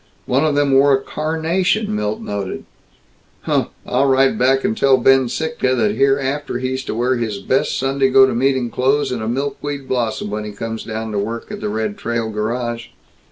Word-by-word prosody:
One 135 Hz, +4 st, +1 dB
of 155 Hz, -2 st, +1 dB
them 145 Hz, -1 st, +2 dB
wore 135 Hz, +1 st, +5 dB
a 135 Hz, -, +3 dB
carnation, 160 Hz, -, -1 dB
Milt 105 Hz, 0 st, -2 dB
noted. 100 Hz, -2 st, -5 dB, 0.8 s
"Huh! -, -, 0 dB, 0.2 s
I'll 130 Hz, +3 st, +1 dB
write 135 Hz, 0 st, +3 dB
back 135 Hz, +2 st, +2 dB
and 215 Hz, +3 st, 0 dB
tell 135 Hz, -10 st, +4 dB
Ben 130 Hz, 0 st, +4 dB
Sittka 155 Hz, -3 st, -1 dB
that 110 Hz, -3 st, +2 dB
hereafter 135 Hz, +3 st, 0 dB
he's 130 Hz, +1 st, -3 dB
to -, -, -4 dB
wear 125 Hz, +2 st, +1 dB
his 110 Hz, -4 st, -2 dB
best 130 Hz, +7 st, 0 dB
Sunday 135 Hz, 0 st, +1 dB
go 135 Hz, 0 st, +7 dB
to 130 Hz, -, -1 dB
meeting 130 Hz, -1 st, +1 dB
clothes 135 Hz, +3 st, +1 dB
and 125 Hz, -3 st, -3 dB
a 110 Hz, -, -3 dB
milkweed 140 Hz, +2 st, -3 dB
blossom 115 Hz, -4 st, -2 dB
when 105 Hz, 0 st, -3 dB
he 105 Hz, -1 st, -7 dB
comes 115 Hz, +2 st, -5 dB
down 110 Hz, 0 st, -4 dB
to 105 Hz, -, -1 dB
work 115 Hz, +3 st, -4 dB
at -, -, -6 dB
the -, -, -2 dB
Red 110 Hz, -1 st, -3 dB
Trail 115 Hz, -1 st, -2 dB
Garage!" 120 Hz, +2 st, -3 dB
130 Hz, 195 wpm, -19 LUFS, 110-135 Hz, 0.8 s, go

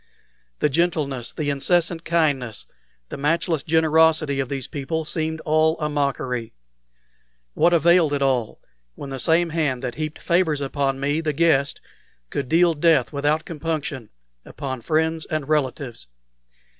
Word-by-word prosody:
The 150 Hz, -, +1 dB
gentleness, 145 Hz, -6 st, -1 dB
the 145 Hz, -2 st, -2 dB
incessant 170 Hz, +4 st, +1 dB
kindness, 145 Hz, -10 st, 0 dB, 0.4 s
the -, -, -6 dB
matchless 160 Hz, +2 st, 0 dB
generosity 160 Hz, -2 st, +3 dB
of 135 Hz, -2 st, -2 dB
these 135 Hz, -3 st, -4 dB
people 155 Hz, +3 st, -3 dB
seemed 160 Hz, +1 st, -3 dB
all 155 Hz, +1 st, +2 dB
a 150 Hz, -1 st, -1 dB
mockery. 130 Hz, -5 st, -2 dB, 1.0 s
What 175 Hz, -, +3 dB
availed 170 Hz, -1 st, +4 dB
it 140 Hz, -, -1 dB
all 125 Hz, -5 st, 0 dB, 0.4 s
when 140 Hz, -, -8 dB
the 135 Hz, -, -5 dB
same 165 Hz, +4 st, +2 dB
hand 145 Hz, -6 st, -1 dB
that 125 Hz, -2 st, -3 dB
heaped 155 Hz, 0 st, -4 dB
favors 170 Hz, -4 st, +1 dB
upon 135 Hz, -1 st, -1 dB
me, 145 Hz, +3 st, 0 dB
the 155 Hz, -2 st, -1 dB
guest, 140 Hz, -3 st, +2 dB, 0.5 s
could 135 Hz, -3 st, -3 dB
deal 170 Hz, +1 st, +4 dB
death 155 Hz, -5 st, +2 dB
without 145 Hz, +2 st, 0 dB
compunction 150 Hz, -7 st, -4 dB, 0.3 s
upon 130 Hz, -3 st, -6 dB
friends 160 Hz, +4 st, 0 dB
and 155 Hz, -3 st, -3 dB
relatives? 135 Hz, -, -2 dB
150 Hz, 140 wpm, -23 LUFS, 135-160 Hz, 1.0 s, availed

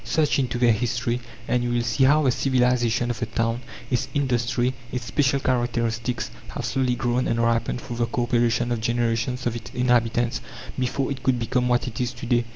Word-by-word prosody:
Search 150 Hz, -3 st, +1 dB
into 125 Hz, -3 st, -1 dB
their 120 Hz, -1 st, +4 dB
history 120 Hz, +2 st, 0 dB, 0.3 s
and 125 Hz, -1 st, +1 dB
you 120 Hz, -, -1 dB
will 120 Hz, 0 st, +1 dB
see 120 Hz, +3 st, +2 dB
how 150 Hz, +3 st, +5 dB
the 130 Hz, -, +4 dB
civilization 125 Hz, -2 st, +2 dB
of 115 Hz, -, -5 dB
the 115 Hz, -, -2 dB
town, 115 Hz, +1 st, -1 dB, 0.3 s
its 125 Hz, -, +1 dB
industry, 125 Hz, -2 st, +1 dB, 0.2 s
its 125 Hz, -2 st, -3 dB
special 135 Hz, +3 st, +2 dB
characteristics, 120 Hz, -2 st, -1 dB, 0.2 s
have -, -, -3 dB
slowly 130 Hz, -2 st, +1 dB
grown 120 Hz, 0 st, 0 dB
and 115 Hz, -, 0 dB
ripened 115 Hz, +1 st, +1 dB
through 120 Hz, -1 st, -7 dB
the 120 Hz, -1 st, +1 dB
co 120 Hz, -, -1 dB
operation 120 Hz, 0 st, +1 dB
of 120 Hz, -2 st, -1 dB
generations 120 Hz, +2 st, 0 dB
of 120 Hz, -1 st, 0 dB
its 115 Hz, -, -7 dB
inhabitants 120 Hz, 0 st, +2 dB, 0.4 s
before 130 Hz, +2 st, -1 dB
it 135 Hz, -2 st, -4 dB
could 130 Hz, -1 st, +2 dB
become 125 Hz, +2 st, 0 dB
what 120 Hz, +1 st, +2 dB
it 120 Hz, +1 st, -4 dB
is 125 Hz, 0 st, -1 dB
to 120 Hz, 0 st, -8 dB
day. 120 Hz, 0 st, +2 dB
120 Hz, 200 wpm, -24 LUFS, 120-125 Hz, 0.4 s, how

